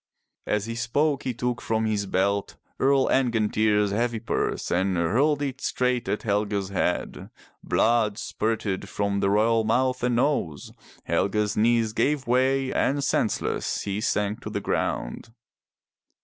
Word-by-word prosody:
*' - - -57
As 105 -1 0
he 115 - -4
spoke 140 +5 0
he 130 - 0
took 125 0 -2
from 110 0 0
his 105 -2 -1
belt 100 +2 0 0.2
Earl 135 0 +3
Angantyr's 110 -4 +2
heavy 115 +2 0
purse 115 - -2
and 95 +1 +1
hurled 135 - +2
it 135 -1 -4
straight 125 -1 0
at 105 - -2
Helge's 100 -2 -1
head. 90 -2 -2 0.3
Blood 110 -3 +2
spurted 110 -5 -2
from 100 0 -1
the 100 - +1
royal 110 +2 +3
mouth 125 +3 +1
and 125 0 +1
nose, 120 - -1 0.3
Helge's 105 +4 0
knees 115 0 +2
gave 140 +3 0
way 130 +2 +1
and 140 +1 +1
senseless - - -1
he 100 +1 -3
sank 105 -1 -1
to - - -6
the - - -3
ground. 115 - -3
110 Hz, 145 wpm, -25 LUFS, 100-125 Hz, 0.3 s, Earl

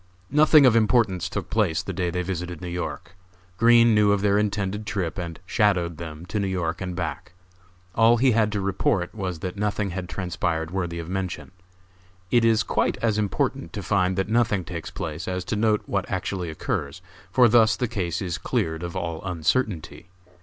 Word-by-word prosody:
Nothing 150 -1 +6
of 125 -3 +5
importance 110 -5 +2
took - - -5
place 95 -8 +1
the - - -5
day 90 -2 -1
they 90 +1 -2
visited 90 -2 -4
New 90 - -7
York. 90 +2 -5 0.4
Green 115 0 +6
knew 105 -1 +4
of 100 -1 +2
their 100 0 +3
intended 105 0 -2
trip 95 -4 -2
and 85 -2 -6
"shadowed" 90 -4 +1
them 80 0 -8
to 105 +4 -3
New 100 - 0
York 85 -2 -2
and 90 -1 -4
back. - - -5 0.6
All 115 +3 +5
he 130 +2 +4
had 110 -2 +2
to 105 - -1
report 95 -1 0
was 95 -6 -4
that 95 +2 -5
nothing 105 -1 -1
had 90 0 -5
transpired 85 -3 -2
worthy 85 -3 -3
of 85 -1 -6
mention. 95 0 -4 0.8
It 120 -2 +4
is 115 -1 +4
quite - - 0
as 110 -2 +2
important 105 -3 -1
to - - -5
find 95 -2 +1
that 95 - 0
nothing 110 -4 +1
takes 85 -3 -6
place 80 +2 -5
as 90 -1 -3
to 105 - -2
note 105 0 +2
what 100 -2 -2
actually 95 -2 -3
occurs, 80 +1 -4 0.3
for 125 -2 +6
thus 110 -1 +5
the 125 - -1
case 90 -6 -2
is 90 -3 -3
cleared 80 0 -1
of 85 +1 -5
all 85 -3 -3
uncertainty. 90 -1 -2
95 Hz, 190 wpm, -24 LUFS, 85-105 Hz, 0.8 s, Nothing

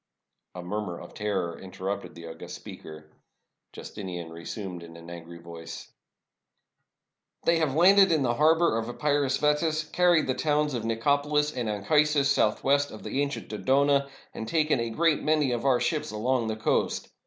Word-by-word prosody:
A 90 - -6
murmur 95 -1 -4
of - - -11
terror 95 -5 -2
interrupted 95 0 -5
the 85 0 -10
august 80 0 -8
speaker. 75 0 -11 0.6
Justinian 90 -5 -7
resumed 90 +2 -7
in 85 0 -11
an 85 +1 -11
angry 85 0 -9
voice: 85 -1 -10 0.8
— - - -56
"They 170 0 +3
have 150 -4 0
landed 190 +3 +6
in 155 -4 +2
the 120 -2 +1
harbor 160 -2 +3
of 115 +1 -4
Epirus 140 0 0
vetus, 155 +1 +1
carried 175 +1 +3
the 130 - 0
towns 150 +1 0
Nicopolis 145 +6 +1
and 120 -3 -2
Anchisus, 140 +7 +2
southwest 140 +4 +2
of 110 - -10
the 140 - -1
ancient 140 0 -3
Dodona, 140 +5 +2 0.2
and 110 - -6
taken 155 -1 +1
a 115 0 -1
great 160 +6 +2
many 150 -4 +2
of 120 +2 -2
our 130 -3 +4
ships 150 -2 -1
along 120 +2 0
the 110 - -2
coast. 110 - 0
130 Hz, 160 wpm, -27 LUFS, 100-150 Hz, 0.8 s, landed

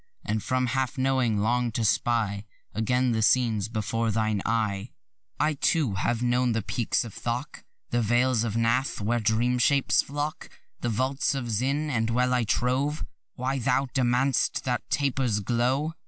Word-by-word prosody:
And 110 +1 -1
from 130 +3 0
half 130 -1 -1
knowing 130 -4 +1
long 120 +3 +1
to 115 0 0
spy 105 -2 0 0.3
Again 125 +4 +1
the 110 -1 0
scenes 110 -2 +2
before 115 +1 -1
thine 110 -1 0
eye. 110 -2 -1 0.5
I, 155 +1 +2
too, 145 - +1
have 115 +6 -1
known 125 0 +2
the 110 -2 -1
peaks 120 +2 -1
of 110 - -9
Thok; 120 +4 -4 0.3
The 120 - +1
vales 120 +1 +2
of 115 -2 -2
Pnath, 115 +4 +1
where 115 +3 0
dream 115 +3 +1
shapes 140 +2 +3
flock; 145 +2 -4 0.3
The 120 - -2
vaults 130 +5 0
of 125 -3 -3
Zinâand 130 0 0
well 125 +2 +1
I 125 -2 +1
trow 130 +6 0 0.4
Why 135 +2 -2
thou 130 +2 +1
demand'st 130 +1 +1
that 125 -1 -1
taper's 135 -6 0
glow. 125 +8 0
120 Hz, 155 wpm, -26 LUFS, 110-130 Hz, 0.5 s, shapes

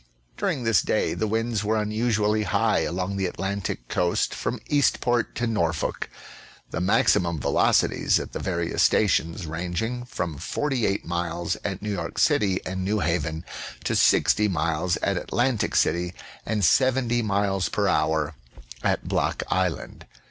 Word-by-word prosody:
During 125 - -1
this 115 -4 +4
day - - 0
the 110 - -1
winds 110 0 -1
were 110 +1 +1
unusually 105 0 +1
high 105 - +2
along 95 +2 -2
the 95 -1 0
Atlantic 95 -8 -4
coast 90 -1 0
from - - -3
Eastport 120 -4 +1
to 120 - -1
IsTorfolk; 85 -9 -1 0.6
the 80 - -2
maximum 85 -3 +2
velocities - - +2
at - - -6
the - - -5
various - - -1
stations 85 -3 +2
ranging 90 +10 -3
from 85 - -4
48 125 -9 -1
miles 85 0 -2
at 95 -1 -4
New 105 - -2
York 100 - -4
City 95 -3 +3
and 95 0 -3
New 105 +2 0
Haven 80 -1 -1 0.4
to - - 0
60 105 0 +4
miles 85 -1 0
at - - +1
Atlantic 125 -6 0
City 85 +2 +1 0.3
and 105 -4 +1
70 125 +1 +3
miles 100 -3 0
per - - 0
hour 75 0 +1 0.5
at - - 0
Block - - 0
Island. 90 -4 -2
95 Hz, 140 wpm, -25 LUFS, 85-110 Hz, 0.6 s, this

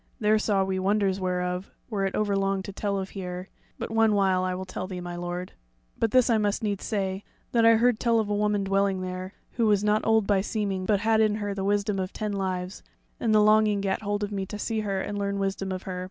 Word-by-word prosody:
There 215 0 +3
saw 200 -2 +2
we 190 0 -1
wonders 195 0 +1
whereof 180 0 -2 0.2
were 200 -4 -1
it 190 - -4
overlong 195 -2 0
to 200 - -7
tell 200 0 -1
of 190 0 -4
here; 180 -1 -6 0.3
but - - -5
one 225 -1 +3
while 190 -2 +2
I 185 0 -1
will 190 +1 -5
tell 185 0 -5
thee, 185 -1 -5
my 175 0 -6
lord. 175 +1 -4 0.4
But 225 - +1
this 255 +2 +4
I 230 -3 +3
must 205 +1 0
needs 205 -2 -2
say, 195 -2 -2 0.3
that 230 -1 +4
I 230 - +7
heard 235 0 +3
tell 230 -2 +3
of 220 - 0
a 205 - -1
woman 205 -1 +1
dwelling 195 -1 +1
there, 185 +1 -5 0.2
who 230 -2 +1
was 205 -1 +3
not 210 +1 +2
old 220 -2 +3
by 200 -2 +2
seeming, 195 -3 -2
but 205 -2 +2
had 220 0 +3
in 215 -1 +3
her 205 -1 -3
the 195 -1 -3
wisdom 205 0 +1
of 185 +1 -3
ten 210 -2 -3
lives, 185 -1 -3 0.4
and 230 - +1
the 215 0 +5
longing 215 -1 +4
gat 195 +1 -1
hold 205 0 -2
of 205 - -3
me 195 -1 -2
to 210 - -6
see 220 +1 -2
her 200 -2 -1
and 205 +1 -4
learn 200 0 -1
wisdom 195 0 -2
of 185 0 -4
her. 185 -1 -5
200 Hz, 245 wpm, -26 LUFS, 190-215 Hz, 0.4 s, I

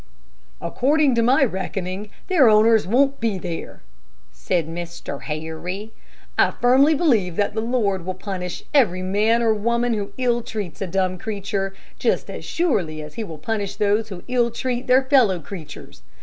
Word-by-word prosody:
"According 290 +1 +2
to 235 - +2
my 255 +4 +4
reckoning, 190 -1 -4 0.2
their 315 -11 +5
owners 220 -1 +5
won't 275 +6 +2
be 225 -4 0
there," 175 - -6 0.5
said 150 - -1
Mr. 170 -3 -6
Harry. 165 +7 -5 0.5
"I - - +6
firmly 270 +5 +4
believe 225 - +2
that 205 +2 0
the 220 - -1
Lord 215 -6 0
will 185 +1 -4
punish 185 -2 -5
every 185 -11 +3
man 215 +5 +2
or 225 -1 +4
woman 235 +3 0
who 205 -2 -4
ill 240 -2 +1
treats 210 -7 -6
a 195 - -1
dumb 185 0 -1
creature 200 -2 -3 0.2
just - - 0
as - - -7
surely 195 - 0
as 150 0 -10
he 225 - -4
will 165 -7 -8
punish 205 +4 -3
those 210 +1 +1
who 185 -3 -8
ill 245 -1 +2
treat 245 +2 -3
their 255 +1 +5
fellow 255 -9 +4
creatures. 160 - -10
210 Hz, 165 wpm, -22 LUFS, 185-240 Hz, 0.5 s, I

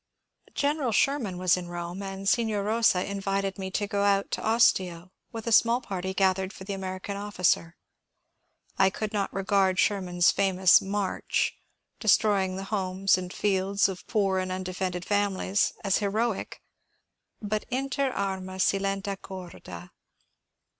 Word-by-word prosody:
General 285 -3 0
Sherman 225 -5 +1
was 180 -1 +3
in 180 -1 -6
Rome, 175 +2 -6
and 195 0 -6
Signer 215 -2 +1
Bosa 215 -3 +2
invited 195 0 -2
me 190 0 -4
to 205 +2 -1
go 200 0 -2
out 200 -1 +2
to - - -2
Ostia 185 -6 +2 0.2
with 225 -1 -7
a 230 - -2
small 230 +2 +5
party 190 -6 -4
gathered 190 0 +1
for 190 - -11
the 200 +1 -4
American 190 +1 -5
officer. 180 -4 0 1.0
I 190 - +6
could 215 +2 -5
not 200 -2 -1
regard 195 -1 +1
Sherman's 180 -4 +2
famous 190 -2 +4
*^ - - -10
march 200 0 -1 0.2
" - - -52
— - - -49
destroying 205 -4 +3
the 190 - -5
homes 190 -1 +2
and 180 -1 -5
fields 195 0 +1
of 190 -2 -7
poor 195 -3 +1
and 185 0 -3
un 185 0 -3
defended 180 -1 -3
families 205 -1 +1
— - - -23
as 195 -2 +2
heroic, 215 +1 -2 0.8
but 210 0 -3
inter 270 +2 -1
arma 190 -4 -4
silent 195 +1 0
corda. 170 - -9
195 Hz, 155 wpm, -27 LUFS, 185-205 Hz, 1.0 s, I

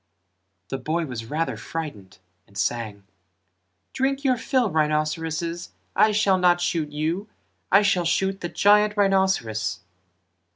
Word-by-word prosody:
The 135 - -3
boy 165 +2 -1
was 120 -5 -6
rather 165 +2 -1
frightened 110 - -7 0.3
and 100 - -15
sang 110 -4 -2 0.9
"Drink 270 +1 -1
your 260 -2 +3
fill, 240 -2 0
rhinceroses, 160 +2 -1 0.2
I 215 +2 +5
shall 205 -3 +2
not 175 -1 +4
shoot 165 -3 -1
you 160 +7 -2 0.4
I 200 +2 +6
shall 190 -4 +2
shoot 190 +3 0
the 175 - -3
giant 210 +3 +3
rhinceros." 190 - +1
170 Hz, 125 wpm, -24 LUFS, 150-200 Hz, 0.9 s, I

